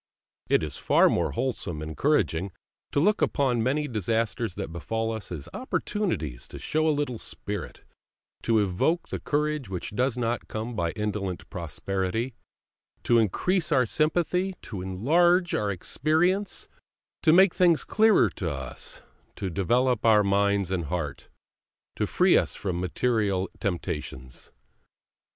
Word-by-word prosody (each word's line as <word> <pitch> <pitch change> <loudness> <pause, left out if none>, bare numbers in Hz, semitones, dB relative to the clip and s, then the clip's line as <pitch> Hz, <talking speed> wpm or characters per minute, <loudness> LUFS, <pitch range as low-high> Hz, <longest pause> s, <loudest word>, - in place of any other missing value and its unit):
It - - +3
is 75 -3 -4
far - - +4
more - - 0
wholesome 95 - -3
and 80 - -5
encouraging 95 - +1 0.4
to - - +1
look 205 +8 +3
upon 130 -5 +2
many 145 +5 0
disasters 115 -2 -1
that - - -5
befall 110 +6 -2
us 110 -4 -6
as 75 -6 -5
opportunities 195 - -2
to - - -9
show 155 +1 0
a - - +4
little 125 -6 -2
spirit, 100 -6 -6 0.6
to 115 -1 +2
evoke 105 - +1
the - - -3
courage 150 -4 -1
which 90 -2 -4
does 125 +4 0
not 120 -1 -1
come 115 +2 -4
by 85 -4 0
indolent 105 -4 -3
prosperity, 95 - -3 0.7
to 120 -1 +4
increase 165 - +1
our 130 -4 +4
sympathy, 175 - +1
to 100 -5 -6
enlarge 170 - +2
our 105 - 0
experience, 160 - 0 0.5
to 155 - +5
make 185 +2 +6
things 175 -3 +4
clearer 220 -1 +4
to 90 - -3
us, 65 -3 -7 0.3
to 95 -2 -4
develop 120 +6 +1
our 110 -2 +5
mind 100 -1 +2
and 90 -3 -1
heart, 75 -3 -4 0.7
to - - -1
free - - +4
us - - +2
from 90 -3 -3
material 100 0 0
temptations. 75 -9 -4
110 Hz, 140 wpm, -27 LUFS, 95-150 Hz, 0.7 s, make